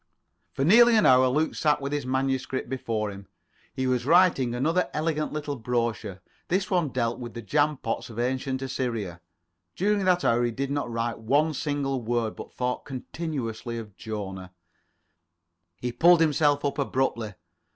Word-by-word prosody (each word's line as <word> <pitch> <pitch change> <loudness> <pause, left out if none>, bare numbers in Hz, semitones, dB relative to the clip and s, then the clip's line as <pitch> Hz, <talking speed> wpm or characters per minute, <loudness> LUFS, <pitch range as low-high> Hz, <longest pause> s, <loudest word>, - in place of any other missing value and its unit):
For 135 - 0
nearly 235 +6 +7
an 215 - +4
hour 130 0 +6
Luke 150 +5 +1
sat 150 -1 +2
with 140 0 -4
his 145 -3 -2
manuscript 130 0 -1
before 115 -5 -2
him. 100 0 -11 0.5
He 130 -1 -1
was 125 -2 +1
writing 150 -6 +4
another 165 +8 +1
elegant 155 0 -1
little 145 -1 -3
brochure. 115 -5 -2 0.3
This 190 +3 0
one 175 -5 +2
dealt 120 -1 -1
with 120 -1 -7
the 115 - -5
jam 150 +5 +1
pots 115 -1 -4
of 115 - -10
Ancient 130 +2 -1
Assyria. 115 -9 -3 0.5
During 200 +1 +1
that 180 -1 +3
hour 120 +1 +3
he 120 - +2
did 135 +4 -3
not 145 -3 -2
write 115 0 -2
one 145 +8 +2
single 140 -3 -2
word, 115 -1 -1
but - - -9
thought 125 0 -2
continuously 130 -4 -5
of 105 -4 -8
Jona. 95 -4 -6 1.2
He 125 +3 -3
pulled 170 +6 +5
himself 145 -2 +2
up 140 - -1
abruptly. 125 -6 -1
130 Hz, 160 wpm, -26 LUFS, 115-150 Hz, 1.2 s, nearly